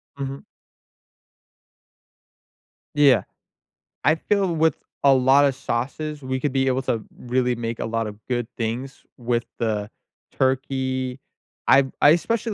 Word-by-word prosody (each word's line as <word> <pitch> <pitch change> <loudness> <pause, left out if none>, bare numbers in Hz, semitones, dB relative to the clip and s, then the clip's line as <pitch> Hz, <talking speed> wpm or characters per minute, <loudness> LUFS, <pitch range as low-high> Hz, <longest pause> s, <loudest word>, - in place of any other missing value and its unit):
Mhm. 135 0 -6 2.5
Yeah. 135 -8 +5 0.8
I 155 - +4
feel 190 0 0
with 160 0 +2 0.3
a 140 -1 +7
lot 135 +2 +5
of 140 - +2
sauces 140 +4 -3
we 130 0 -2
could 145 +1 -1
be 135 -1 +2
able 130 0 +1
to 115 -4 -1
really 125 0 0
make 115 0 -4
a - - -2
lot 115 -1 -1
of 105 - -7
good 120 -2 -1
things 120 +4 -4
with 120 -1 -1
the 105 -3 -1 0.5
turkey. 130 -1 0 0.5
I've 135 0 +5
I 145 - +8
especially 225 +6 +1
130 Hz, 130 wpm, -23 LUFS, 120-140 Hz, 2.5 s, I